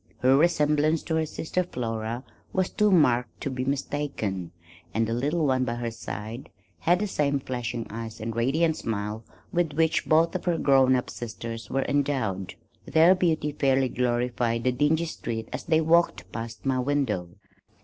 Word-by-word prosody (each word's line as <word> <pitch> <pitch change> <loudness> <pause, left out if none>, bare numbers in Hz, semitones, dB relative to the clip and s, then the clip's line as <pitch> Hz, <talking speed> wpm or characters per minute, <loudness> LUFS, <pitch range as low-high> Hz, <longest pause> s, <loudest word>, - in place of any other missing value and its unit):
Her 130 +1 +5
resemblance 150 0 +3
to 160 - -2
her 160 -1 0
sister 160 +4 -2
Flora 115 -6 -4 0.3
was 185 -1 0
too 210 -1 +3
marked 125 -10 +3
to 140 - -2
be 130 0 -2
mistaken, 135 - -2 0.5
and 115 0 +2
the 115 - -2
little 150 +7 0
one 130 -2 +2
by 120 -2 -2
her 120 -1 -3
side 110 +2 -7 0.3
had 175 +2 +3
the 210 - -1
same 145 -7 0
flashing 120 -3 -4
eyes 115 0 -6
and 110 0 -4
radiant 155 +7 +2
smile 105 0 -3 0.3
with 170 -4 +1
which 160 +1 +1
both 160 +2 +4
of 185 - -4
her 175 -2 +1
grown 135 -3 +4
up 125 - -2
sisters 115 -1 -6
were 135 0 0
endowed. 135 -10 -1 0.3
Their 165 +3 +6
beauty 165 -5 +1
fairly 135 -2 +2
glorified 120 -1 0
the 130 - +3
dingy 150 +6 +2
street 115 -8 -5
as 130 - -5
they 160 0 +3
walked 170 +2 +2
past 115 +1 -7
my 130 -1 +1
window. 125 -10 0
130 Hz, 170 wpm, -26 LUFS, 115-155 Hz, 0.5 s, Their